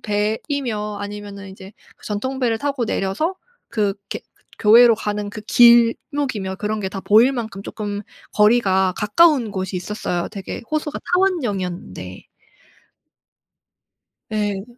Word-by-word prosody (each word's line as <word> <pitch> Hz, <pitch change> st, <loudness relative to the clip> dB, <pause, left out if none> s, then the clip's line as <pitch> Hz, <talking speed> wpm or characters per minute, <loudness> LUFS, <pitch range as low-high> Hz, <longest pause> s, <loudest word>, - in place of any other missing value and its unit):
배이며 210 Hz, 0 st, -2 dB
아니면은 205 Hz, -1 st, -7 dB
인제 190 Hz, +1 st, -12 dB, 0.2 s
그 -, -, -14 dB
전통배를 235 Hz, +2 st, -1 dB
타고 275 Hz, -2 st, -1 dB
내려서 215 Hz, -, -1 dB, 0.3 s
그 210 Hz, -2 st, 0 dB, 0.2 s
이렇게 -, -, -4 dB, 0.4 s
교회로 230 Hz, +2 st, +7 dB
가는 210 Hz, -1 st, -3 dB
그 210 Hz, +1 st, -8 dB
길목이며 235 Hz, -2 st, +3 dB
그런 215 Hz, +2 st, -2 dB
게 190 Hz, -, -2 dB
다 195 Hz, 0 st, -6 dB
보일 225 Hz, +7 st, +5 dB
만큼 220 Hz, -6 st, -5 dB
쪼끔 205 Hz, -1 st, -5 dB, 0.3 s
거리가 195 Hz, -4 st, +3 dB
가까운 270 Hz, 0 st, +3 dB
곳이 190 Hz, -1 st, -3 dB
있었어요. 180 Hz, -2 st, -3 dB
되게 200 Hz, 0 st, -7 dB
호수가 305 Hz, -1 st, -2 dB
타원형이었는데. 195 Hz, -, -2 dB, 2.1 s
예. 205 Hz, -2 st, -1 dB
210 Hz, 275 characters per minute, -21 LUFS, 195-240 Hz, 2.1 s, 교회로